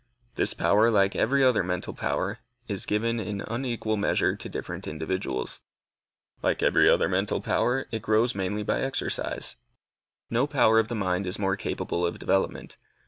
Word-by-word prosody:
This - - +1
power, 110 +3 +4
like 100 -3 +3
every 135 +4 +2
other 125 -5 +4
mental 90 0 -3
power, 100 +4 -2 0.3
is 100 -3 -3
given 115 +2 0
in 105 -2 -4
unequal 115 -2 -2
measure 100 - +1
to - - -8
different - - -6
individuals. 80 -4 -3 0.8
Like - - 0
every - - +5
other - - +4
mental - - 0
power, 130 +2 +1
also, - - -12
it 110 -2 -3
grows 110 +3 +2
mainly 100 +1 -2
by - - 0
exercise. 135 0 -1 0.7
No 120 +4 +1
power 115 -6 +4
of 110 - +1
the 120 - -4
mind 95 -2 -1
is 90 - -2
more 95 -1 0
capable 90 -3 -3
of 85 - -1
development. 95 - -1
105 Hz, 165 wpm, -27 LUFS, 95-115 Hz, 0.8 s, every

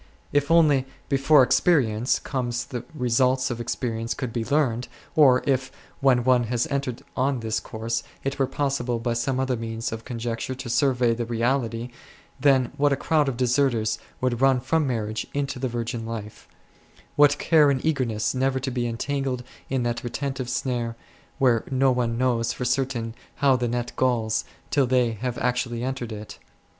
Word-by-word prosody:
If 145 0 +2
only, 150 -6 +4 0.2
before 135 +1 +5
experience 125 -3 +2
comes, 120 -3 -3
the 120 -3 -5
results 130 0 +2
of 120 - -4
experi 115 -1 -3
ence 115 - -2
could 125 -4 -4
be 115 - -1
learnt, 130 -3 +1 0.3
or 130 -5 +6
if, 130 -1 0 0.3
when 130 -3 +3
one 125 -1 +3
has 120 +1 0
entered 135 -3 -2
on 130 -1 0
this 110 -1 -1
course, 115 +1 -3 0.2
it 135 +1 -3
were 135 - +2
possible 135 -3 -1
by 115 +1 -1
some 130 +3 -1
other 130 -1 0
means 115 0 -4
of 115 0 -6
conjecture 120 +1 -4
to 130 -1 -7
survey 125 -1 +3
the 115 0 -3
reality, 120 0 -1 0.5
then 130 -3 +3
what 145 0 +3
a - - +3
crowd 150 +1 +1
of 125 - -4
deserters 125 -3 +1 0.2
would 125 -1 0
run 135 -1 +4
from 150 +4 +1
marriage 110 -3 -2
into 140 -2 -2
the 130 - -1
virgin 120 0 -3
life; 110 -2 -7 0.7
what 145 0 +5
care 155 -2 +4
and 135 0 0
eagerness 125 -8 0
never 130 0 +1
to 130 0 -3
be 120 -1 -1
entangled 130 +1 -2 0.3
in 130 -2 0
that 120 -1 -2
retentive 130 +1 -3
snare, 120 -2 -2 0.4
where 125 -5 +3
no 135 0 +3
one 120 -2 0
knows 120 -2 +1
for 125 - -4
certain 125 -3 -1 0.2
how 140 -2 +4
the 125 -1 0
net 120 0 -2
galls 115 -4 +1 0.3
till 140 -4 +3
they 125 -2 +2
have 120 +2 -4
actually 125 -1 -1
entered 130 -3 -3
it 105 0 -8
125 Hz, 170 wpm, -25 LUFS, 115-135 Hz, 0.7 s, or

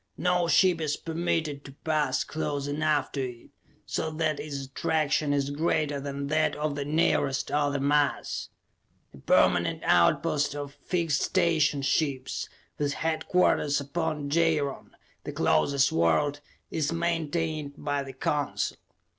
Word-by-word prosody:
No 180 -1 +1
ship 175 -1 +4
is 150 -2 -1
permitted 160 -3 -2
to 135 - -11
pass 150 -5 +1
close 145 -3 -3
enough 150 +1 0
to 140 - -2
it 125 -2 -6 0.4
so 160 - -2
that 155 -1 -1
its 140 -3 -5
attraction 150 +2 0
is 140 -1 0
greater 150 -1 0
than 140 0 -4
that 155 +2 +1
of 150 0 -1
the 145 0 -3
nearest 140 -3 +1
other 145 -1 +1
mass. 145 +1 0 0.6
A 70 - -13
permanent - - +2
outpost 145 - +3
of 145 -1 -5
fixed 165 -2 -1
station 155 -4 +2
ships, 135 -3 -1 0.3
with 145 -1 0
headquarters 160 -2 +1
upon 150 0 -3
Jaron, 160 -3 +1 0.3
the - - -5
closest 135 - +2
world, 85 - +2 0.3
is 155 -1 0
maintained 165 -3 -1
by 145 -1 -1
the 135 -1 -7
Council. 145 +2 -1
145 Hz, 130 wpm, -27 LUFS, 140-160 Hz, 0.6 s, ship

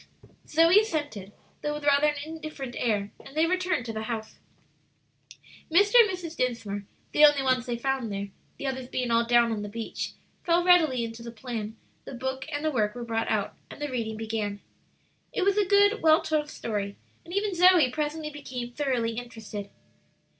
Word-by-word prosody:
Zoe 330 +5 +6
assented, 290 - -3 0.3
though 295 0 -2
with 295 -1 -6
rather 285 +1 +5
an 300 - +1
indifferent 310 -5 -7
air, 205 -4 0
and 275 - -12
they 320 - +5
returned 365 -7 0
to 225 - -4
the 220 - -4
house. 220 -2 -5 1.3
Mr. 400 +6 +4
and 450 -3 +7
Mrs. 355 -3 -5
Dinsmore, 220 -5 -2 0.3
the 300 - +4
only 290 -2 +7
ones 255 -2 +1
they 240 -1 -2
found 260 -2 -1
there, 200 0 -4 0.3
the - - -6
others 260 -2 -3
being 250 -1 -2
all 230 0 +3
down 240 -1 +4
on 215 -2 -2
the 205 - -5
beach, 225 +2 -5 0.3
fell 345 0 +3
readily 315 -9 +5
into 230 0 -6
the 235 - -7
plan; 225 -2 -6 0.3
the - - -7
book 265 +2 -4
and 290 +1 -3
the 310 - +2
work 215 -5 0
were 240 -1 -5
brought 225 -1 -1
out, - - 0 0.2
and - - -11
the 295 -1 -3
reading 220 -3 -3
began. 215 -2 -3 0.7
It 445 -6 -1
was 395 +1 +3
a 410 - +3
good, 405 +2 +4
well 315 +1 +5
told 310 -2 0
story, 205 -6 -4 0.3
and 340 - -12
even 400 +1 0
Zoe 355 -6 +6
presently 300 +1 -3
became 255 -4 -6
thoroughly 240 -4 -1
interested. 220 -4 -7
260 Hz, 185 wpm, -27 LUFS, 230-315 Hz, 1.3 s, and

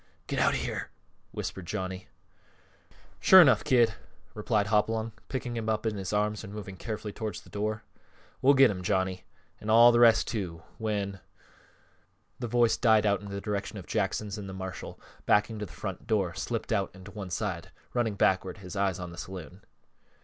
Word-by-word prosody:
"Get - - -3
me - - +3
out - - +4
of - - 0
here," - - -4 0.4
whispered 95 -3 -6
Johnny. 95 +1 -4 1.1
"Shore 190 - +8
enough, 145 -8 +6
Kid; 120 -3 +4
but - - -9
keep - - -16
quiet," 75 +6 -28
replied 105 -2 0
Hopalong, 110 +2 +1 0.2
picking 125 -2 -3
him 110 -1 -2
up 110 +1 -1
in 110 -1 0
his 95 -2 -4
arms 105 0 0
and 100 - -8
moving 100 -2 -7
carefully 105 +1 -5
towards 110 -5 -5
the - - -18
door. 105 +1 -2 0.6
"We'll 140 +2 +6
get 135 -3 +7
him, 90 -2 -5
Johnny; 95 -1 -1 0.3
an' 105 - -6
all 120 +2 +8
th' - - +4
rest, 115 -2 +6
too, 85 -7 -4 0.2
when" 100 -3 -2 1.2
the 120 - -3
voice 120 0 +3
died 110 -4 +4
out 100 -1 +2
in 100 - -8
the 100 0 -4
direction 100 -1 -3
of - - -8
Jackson's 105 0 -2
and 100 -1 -7
the - - -7
marshal, 95 0 -7 0.3
backing 105 +1 +3
to 105 - -4
the - - -16
front - - -6
door, 95 -6 +1
slipped - - -4
out - - +1
and 95 0 -13
to 105 - -10
one 100 -3 -7
side, 90 -2 -3 0.2
running 120 -4 0
backward, 95 -2 +1
his 95 0 -9
eyes 95 -2 +1
on 90 -1 -6
the 85 - -9
saloon. 90 0 -8
105 Hz, 200 wpm, -29 LUFS, 95-110 Hz, 1.2 s, Shore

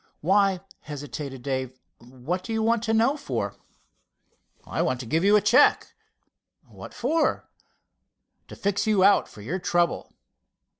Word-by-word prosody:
"Why," 195 +1 +2 0.2
hesitated 140 -2 -7
Dave, 130 -2 -3 0.2
"what 130 +9 -5
do - - -7
you 220 0 0
want 230 0 +2
to 220 - 0
know 230 +6 +3
for?" 295 - -4 1.1
"I - - -2
want 130 -1 0
to - - -8
give 160 +8 0
you 205 +2 +5
a 210 - +5
check." - - +4 0.7
"What - - -11
for?" 305 +5 0 1.0
"To - - -10
fix 200 +2 -1
you 205 -3 +3
out 200 +1 +5
for 105 - -14
your 165 - -4
trouble." 175 -1 0
180 Hz, 145 wpm, -25 LUFS, 135-210 Hz, 1.1 s, you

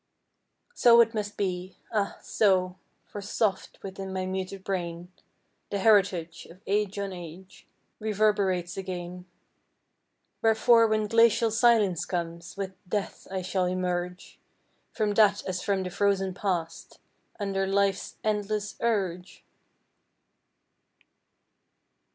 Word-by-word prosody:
So 235 - +6
it 230 0 +2
must 205 -2 -4
be 185 -1 -3 0.2
ah, 205 -2 0
so; 185 -3 +2 0.3
for 205 - -8
soft 205 0 -1
Within 195 0 -6
my 185 0 -2
muted 190 +1 -4
brain 175 -2 -4 0.6
The 200 - -1
heritage 190 -5 +2
Of 175 - -15
age 205 0 0
on 200 -1 -3
age 175 +2 -11 0.3
Reverberates 200 -5 +1
again. 180 -1 -6 1.1
Wherefore 225 +1 +5
when 215 -1 +1
glacial 230 +1 +4
Silence 210 -7 +3
comes 170 0 -5
With 195 -1 -4 0.2
Death 205 -1 -3 0.2
shall 185 0 0
I - - 0
emerge 180 0 -3 0.5
From 210 -2 0
that 210 -1 +4
as 185 -1 -3
from 195 0 0
the 180 - -5
frozen 195 -1 +1
Past, 175 -4 -3 0.4
Under 195 -1 -1
Life's 195 0 0
endless 210 -1 -1
urge? 190 -6 -2
195 Hz, 110 wpm, -27 LUFS, 180-210 Hz, 1.1 s, So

